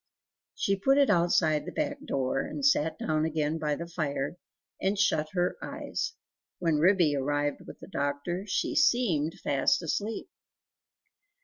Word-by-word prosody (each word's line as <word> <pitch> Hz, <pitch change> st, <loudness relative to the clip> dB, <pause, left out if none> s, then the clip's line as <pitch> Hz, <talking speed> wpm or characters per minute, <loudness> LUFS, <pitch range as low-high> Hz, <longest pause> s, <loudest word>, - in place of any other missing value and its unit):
She 195 Hz, -, +1 dB
put 270 Hz, +7 st, +3 dB
it 280 Hz, -5 st, +5 dB
outside 170 Hz, -4 st, +3 dB
the -, -, -4 dB
back 290 Hz, -2 st, -3 dB
door, 135 Hz, -, -1 dB
and 280 Hz, -, -4 dB
sat 160 Hz, -, +3 dB
down 155 Hz, 0 st, 0 dB
again 155 Hz, 0 st, -1 dB
by 150 Hz, -1 st, 0 dB
the 170 Hz, -, -5 dB
fire, 155 Hz, -4 st, -3 dB, 0.5 s
and 195 Hz, +2 st, +1 dB
shut 155 Hz, -6 st, +2 dB
her 180 Hz, -1 st, 0 dB
eyes; 455 Hz, -, -4 dB, 0.4 s
when 165 Hz, -4 st, +1 dB
Ribby 170 Hz, -3 st, +4 dB
arrived 145 Hz, +1 st, -1 dB
with -, -, -10 dB
the -, -, -10 dB
doctor, 160 Hz, +3 st, -2 dB
she -, -, 0 dB
seemed 190 Hz, -, +2 dB
fast 140 Hz, +5 st, +2 dB
asleep. 210 Hz, +7 st, -2 dB
165 Hz, 145 wpm, -29 LUFS, 150-195 Hz, 0.5 s, it